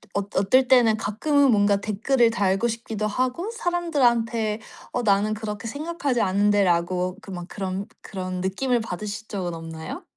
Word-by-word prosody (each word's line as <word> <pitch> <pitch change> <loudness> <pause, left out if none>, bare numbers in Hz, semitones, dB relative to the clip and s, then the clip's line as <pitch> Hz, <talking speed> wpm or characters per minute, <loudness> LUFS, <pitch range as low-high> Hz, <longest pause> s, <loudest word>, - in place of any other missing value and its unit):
어 200 - +2 0.2
어떨 250 +7 +4
때는 235 -4 +5
가끔은 280 +7 +2
뭔가 205 -1 +4
댓글을 230 +4 +2
달고 200 +1 +1
싶기도 220 -2 -3
하고 255 - -1
사람들한테 240 - +1 0.3
"어 - - 0
나는 205 +1 +2
그렇게 210 +1 -5
생각하지 290 -2 -2
않는데?"라고 185 -2 +2
그 195 - -10
막 175 -1 -6
그런 195 0 -4 0.2
그런 185 -2 -5
느낌을 235 +6 0
받으신 210 +1 -5
적은 180 -4 -3
없나요? 160 -1 -7
215 Hz, 335 characters per minute, -24 LUFS, 195-245 Hz, 0.3 s, 때는